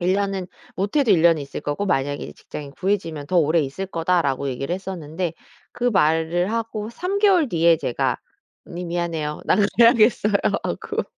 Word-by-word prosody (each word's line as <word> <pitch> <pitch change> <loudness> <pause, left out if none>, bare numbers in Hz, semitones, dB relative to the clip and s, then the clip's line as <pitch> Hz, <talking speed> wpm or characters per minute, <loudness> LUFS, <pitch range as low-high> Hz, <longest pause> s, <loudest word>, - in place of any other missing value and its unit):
"1 180 +2 +2
년은 195 -2 -2 0.3
못해도 220 +6 +1
1 165 -4 +3
년은 165 -2 +5
있을 140 - -7
거고 145 +8 -2
만약에 145 -5 -1
직장이 145 -2 -9
구해지면 165 -5 -2
더 185 - 0
오래 160 +1 +3
있을 150 +7 -4
거다."라고 165 -6 0
얘기를 135 +6 -3
했었는데 180 -3 -5 0.4
그 245 - -5
말을 170 -1 +2
하고 225 -1 -3
3 365 +10 -2
개월 375 -8 +4
뒤에 170 -3 +4
제가 120 - -1 0.5
"언니 175 +1 -6
미안해요 170 -3 -3
나 - - +4 0.2
가야겠어요." 230 -2 +5 0.3
하고 - - -3
175 Hz, 335 characters per minute, -22 LUFS, 155-205 Hz, 0.5 s, 년은